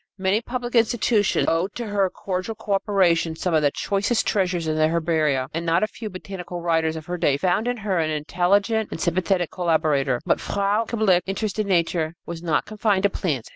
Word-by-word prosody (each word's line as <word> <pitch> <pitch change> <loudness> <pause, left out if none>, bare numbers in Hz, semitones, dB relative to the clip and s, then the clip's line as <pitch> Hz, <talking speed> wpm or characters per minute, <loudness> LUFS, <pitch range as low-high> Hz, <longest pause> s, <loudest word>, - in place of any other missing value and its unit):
Many 190 +3 +1
public 240 0 -5
institutions 225 -2 +2
owed 170 +5 0
to 240 - -4
her 200 -3 +1
cordial 185 +4 -4
coöperation 195 -6 +1
some 180 +1 -1
of 155 - +4
the 145 - +3
choicest 200 - 0
treasures 180 -5 0
in 155 - 0
their 155 0 +3
herbaria, 155 -5 +1
and 165 +1 -2
not 170 +2 +2
a - - +2
few 220 0 -7
botanical 185 -2 -7
writers 165 -2 +1
of 160 -1 -7
her 180 +1 -4
day 145 -5 +2
found 185 +8 0
in 245 0 -1
her 200 -5 -1
an 160 -1 0
intelligent 195 +8 +1
and - - -6
sympathetic 180 0 0
collaborator. 155 -7 +1
But - - +2
Frau 200 +3 0
Kablick's 195 -7 +2
interest 205 +2 -3
in 210 - 0
nature 170 -3 0
was 170 -1 -6
not 165 -3 0
confined 210 -2 0
to 200 - +3
plants. 145 -13 -2
180 Hz, 195 wpm, -23 LUFS, 165-205 Hz, -, of